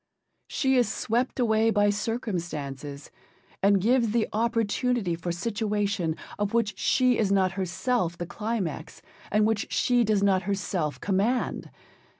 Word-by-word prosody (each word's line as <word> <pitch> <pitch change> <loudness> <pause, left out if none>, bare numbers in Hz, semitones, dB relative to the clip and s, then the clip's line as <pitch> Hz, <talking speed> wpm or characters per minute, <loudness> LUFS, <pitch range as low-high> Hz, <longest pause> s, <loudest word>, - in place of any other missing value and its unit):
She 265 -2 +1
is 240 -5 +2
swept 245 +4 -1
away 220 -2 +3
by 205 -2 +3
circumstances, 170 - -4 0.5
and 200 0 +4
gives 230 +3 +2
the 225 +1 +1
opportunity 230 -2 0
for 170 +1 -3
situation, 205 -3 -1 0.2
of 205 +2 -1
which 225 -3 +1
she 255 -2 +3
is 205 -3 +1
not 190 -2 +3
herself 190 0 -1
the 175 - -4
climax, 190 -5 -4 0.3
and 210 +1 +3
which 220 -1 -1
she 245 -1 +3
does 210 -2 +1
not 195 -2 +3
herself 190 -5 -2
command. 205 +6 0
205 Hz, 135 wpm, -27 LUFS, 185-230 Hz, 0.5 s, and